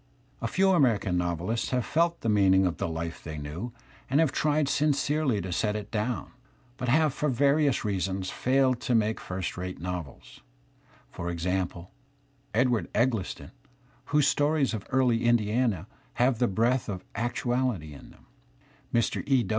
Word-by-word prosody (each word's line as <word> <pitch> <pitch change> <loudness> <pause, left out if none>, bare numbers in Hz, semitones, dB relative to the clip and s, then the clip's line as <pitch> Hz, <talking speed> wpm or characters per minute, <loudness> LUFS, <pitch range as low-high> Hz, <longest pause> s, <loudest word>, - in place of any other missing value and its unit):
A 115 - -1
few 190 +10 +1
Ameri 135 - +4
can 90 -4 -2
novelists 90 +6 -1
have 125 -2 0
felt 170 +2 +1
the - - -3
meaning 95 -3 +4
of 90 - -1
the - - -2
life 80 0 -5
they 80 -1 -6
knew 75 +11 -5 0.4
and 135 +3 +3
have 160 -4 +3
tried 150 -1 +1
sincerely 145 -4 +1
to 90 - -5
set 105 +4 0
it 105 -1 -5
down, 115 +3 -2 0.5
but 125 - -2
have 155 +2 +3
for 150 +1 -1
various 140 +1 +2
reasons 95 -1 -2
failed 130 -1 +2
to 125 0 0
make 110 0 +1
first 90 0 -4
rate 90 +1 -5
novels; 85 -5 -7 0.7
for 85 0 -5
example, 90 0 -2 0.6
Edwa 120 0 +2
rd 85 - -8
Eggleston, 115 -4 -1 0.5
whose 150 -1 +3
stories 145 -2 +2
of 105 -3 -5
early 125 -3 +2
Indiana 115 -4 +2 0.3
have 120 -1 +2
the 125 - +3
breath 115 +5 +1
of 95 -3 -5
actuaUty 120 -6 -1
in 70 - -12
them; - - -20 0.7
Mr. 115 -1 +1
E. 135 -4 +3
115 Hz, 160 wpm, -28 LUFS, 95-130 Hz, 0.7 s, Ameri